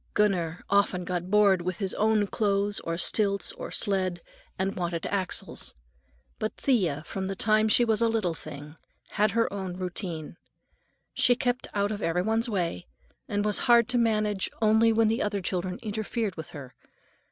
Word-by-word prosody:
Gunner 180 Hz, -5 st, +1 dB
often 195 Hz, -3 st, +2 dB
got 180 Hz, 0 st, -3 dB
bored 200 Hz, -3 st, +4 dB
with 180 Hz, 0 st, -3 dB
his 195 Hz, -3 st, -2 dB
own 215 Hz, -1 st, +2 dB
clothes 200 Hz, 0 st, 0 dB
or 165 Hz, 0 st, -3 dB
stilts 200 Hz, +2 st, +1 dB
or -, -, -7 dB
sled, 185 Hz, -3 st, -1 dB, 0.4 s
and 195 Hz, +1 st, -1 dB
wanted 170 Hz, -2 st, -3 dB
Axel's. 190 Hz, -3 st, -1 dB, 0.6 s
But 215 Hz, -, -2 dB
Thea, 180 Hz, -, +1 dB
from 190 Hz, -1 st, -4 dB
the 195 Hz, -, -3 dB
time 215 Hz, +2 st, +3 dB
she 240 Hz, +3 st, +4 dB
was 220 Hz, -1 st, +1 dB
a 230 Hz, -, +4 dB
little 220 Hz, -7 st, 0 dB
thing, 150 Hz, 0 st, -10 dB, 0.3 s
had 210 Hz, +1 st, +2 dB
her 230 Hz, -2 st, +1 dB
own 190 Hz, -3 st, -4 dB
routine. 175 Hz, -3 st, -5 dB, 0.8 s
She 245 Hz, -, +4 dB
kept 245 Hz, 0 st, -1 dB
out 200 Hz, +1 st, +1 dB
of 210 Hz, 0 st, -4 dB
every 175 Hz, +1 st, 0 dB
one's 225 Hz, +3 st, 0 dB
way, 175 Hz, -4 st, -2 dB, 0.4 s
and 205 Hz, -1 st, -1 dB
was 210 Hz, -1 st, +2 dB
hard 235 Hz, -1 st, +6 dB
to 245 Hz, -1 st, +2 dB
manage 215 Hz, -4 st, +1 dB
only 220 Hz, +1 st, +4 dB
when 225 Hz, 0 st, +3 dB
the 225 Hz, +2 st, +1 dB
other 205 Hz, -1 st, -1 dB
children 185 Hz, 0 st, -2 dB
interfered 215 Hz, -2 st, -2 dB
with 160 Hz, +1 st, -7 dB
her. 140 Hz, -6 st, -10 dB
200 Hz, 170 wpm, -27 LUFS, 180-220 Hz, 0.8 s, hard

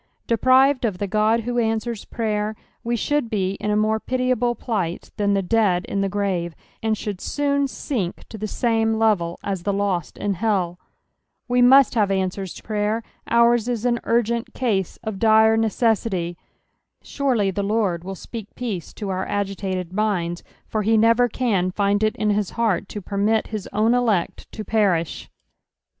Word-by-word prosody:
Deprived 255 Hz, +4 st, +4 dB
of 210 Hz, -6 st, 0 dB
the 205 Hz, -, -2 dB
God 215 Hz, +3 st, +2 dB
who 240 Hz, +1 st, -1 dB
answers 225 Hz, -1 st, -1 dB
praver, 215 Hz, -1 st, -2 dB, 0.3 s
we 235 Hz, +1 st, 0 dB
should 290 Hz, +1 st, 0 dB
be 190 Hz, -4 st, 0 dB
in 210 Hz, -, -2 dB
a 210 Hz, -, +2 dB
more 215 Hz, +1 st, +2 dB
pitiable 250 Hz, -1 st, 0 dB
plight 190 Hz, -10 st, -3 dB
than 200 Hz, -1 st, +2 dB
the 195 Hz, -, +1 dB
dead 190 Hz, -3 st, +2 dB
in 200 Hz, -, -2 dB
the 195 Hz, -, 0 dB
grave, 185 Hz, -4 st, -2 dB, 0.3 s
and 220 Hz, -1 st, 0 dB
should 200 Hz, -3 st, -5 dB
soon 280 Hz, -1 st, 0 dB
sink 225 Hz, -9 st, -4 dB
to -, -, -10 dB
the 215 Hz, 0 st, -4 dB
same 225 Hz, 0 st, +1 dB
level 205 Hz, -7 st, +1 dB
u 200 Hz, -, 0 dB
tbe 195 Hz, +2 st, -2 dB
lost 190 Hz, -5 st, -1 dB
in 205 Hz, -1 st, -1 dB
hell. 185 Hz, -3 st, -1 dB, 0.7 s
We 245 Hz, 0 st, +2 dB
mutt 265 Hz, +2 st, +7 dB
have 210 Hz, -4 st, +2 dB
answers 190 Hz, -1 st, -1 dB
to -, -, -11 dB
prayer: 215 Hz, +1 st, -1 dB, 0.3 s
onra 235 Hz, 0 st, +4 dB
is 240 Hz, -1 st, -2 dB
an 240 Hz, -1 st, +2 dB
ui^nt 235 Hz, 0 st, 0 dB
case 205 Hz, -8 st, -1 dB
of 220 Hz, -4 st, -4 dB
dire 220 Hz, 0 st, +5 dB
neceauty; 220 Hz, -5 st, 0 dB, 0.7 s
surely 245 Hz, -9 st, 0 dB
the 200 Hz, -, -2 dB
Lord 200 Hz, -4 st, 0 dB
will 195 Hz, +1 st, -6 dB
PSALH -, -, -14 dB
THE 235 Hz, -, -4 dB
TWSKTr -, -, -3 dB
BTQHTH. -, -, -43 dB
23 245 Hz, -2 st, -3 dB
stpe&k -, -, 0 dB
peace 175 Hz, -, -9 dB
to 210 Hz, -, -7 dB
onr.agit&ted 190 Hz, -1 st, -3 dB
minds, 185 Hz, -5 st, -1 dB, 0.2 s
for 215 Hz, -, -2 dB
he 220 Hz, +2 st, +3 dB
never 230 Hz, +2 st, +4 dB
can 205 Hz, -7 st, 0 dB
find 200 Hz, +2 st, +1 dB
it 215 Hz, 0 st, +1 dB
in 210 Hz, -1 st, +1 dB
his 205 Hz, -2 st, -1 dB
bcart 215 Hz, -5 st, 0 dB
to 205 Hz, -, -6 dB
permit 210 Hz, +4 st, 0 dB
bic 215 Hz, -3 st, -4 dB
own 220 Hz, +3 st, +2 dB
elect 225 Hz, -8 st, 0 dB
to 215 Hz, -, -7 dB
perish. 190 Hz, -7 st, 0 dB
215 Hz, 180 wpm, -22 LUFS, 195-230 Hz, 0.7 s, mutt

